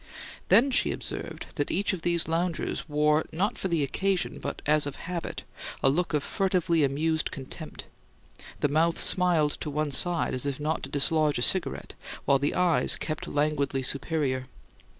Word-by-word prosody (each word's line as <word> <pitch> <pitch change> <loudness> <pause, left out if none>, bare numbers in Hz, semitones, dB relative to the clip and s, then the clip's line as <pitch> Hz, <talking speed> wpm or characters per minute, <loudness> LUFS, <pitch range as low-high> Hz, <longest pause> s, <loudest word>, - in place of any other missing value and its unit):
Then 270 +4 +5
she - - +2
observed - - -5
that 145 - -1
each 200 +2 +1
of 180 - -4
these 170 -1 0
loungers 170 0 -2
wore 150 +1 +2
not 190 +6 -1
for - - -3
the 165 -5 +1
occasion, 190 +7 0
but - - -6
as 150 0 +3
of 145 - -5
habit, 175 -1 -5 0.4
a 135 - +6
look 170 +1 0
of 145 - 0
furtively 180 -4 +1
amused 155 +3 0
contempt; 145 +3 -8 0.8
the - - +3
mouth 160 +4 +2
smiled 170 -5 +3
to - - -3
one 150 0 -1
side 175 +4 +3
as 130 +2 0
if 140 -1 -3
not 155 +2 -1
to - - -5
dislodge 150 +1 +2
a 120 - 0
cigarette, 185 +4 0 0.3
while 140 -1 +4
the 140 - -1
eyes 180 -2 +3
kept 165 +3 -4
languidly 145 -2 0
superior. 135 -1 -1
155 Hz, 170 wpm, -27 LUFS, 145-175 Hz, 0.8 s, a